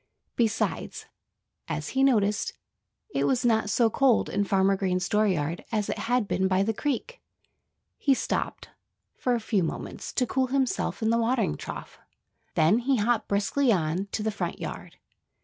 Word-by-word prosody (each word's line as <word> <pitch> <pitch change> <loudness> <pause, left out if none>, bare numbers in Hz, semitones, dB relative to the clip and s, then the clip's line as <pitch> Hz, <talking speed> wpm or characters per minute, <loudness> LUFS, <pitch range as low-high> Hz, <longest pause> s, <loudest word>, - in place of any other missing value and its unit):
Besides, 225 -2 -1 0.6
as - - -3
he 265 - 0
noticed, 210 -5 +2 0.6
it - - +1
was 255 -2 +1
not 220 -3 +2
so 230 +2 +3
cold 265 -2 +3
in 205 - 0
Farmer 195 0 +3
Green's 185 -2 -1
dooryard 180 -7 +1
as 215 -3 -1
it - - -2
had 245 -4 +2
been 190 -1 +1
by 190 +1 +2
the 225 +2 0
creek. 295 - -3 0.8
He 275 -2 +3
stopped, - - -3 0.5
for 250 -1 0
a - - -1
few 215 -3 0
moments, 165 - -4
to 255 - +2
cool 260 +1 0
himself 260 -3 -1
in 220 - +2
the 230 - +3
watering 235 - +1
trough. - - -8
And - - -32 0.5
then 160 +7 +4
he 265 +2 +1
hopped 225 +1 +1
briskly 205 +7 +2
on 175 +1 0
to 215 - -1
the 220 - 0
front 205 - -3
yard. - - -7
220 Hz, 165 wpm, -27 LUFS, 195-250 Hz, 0.8 s, then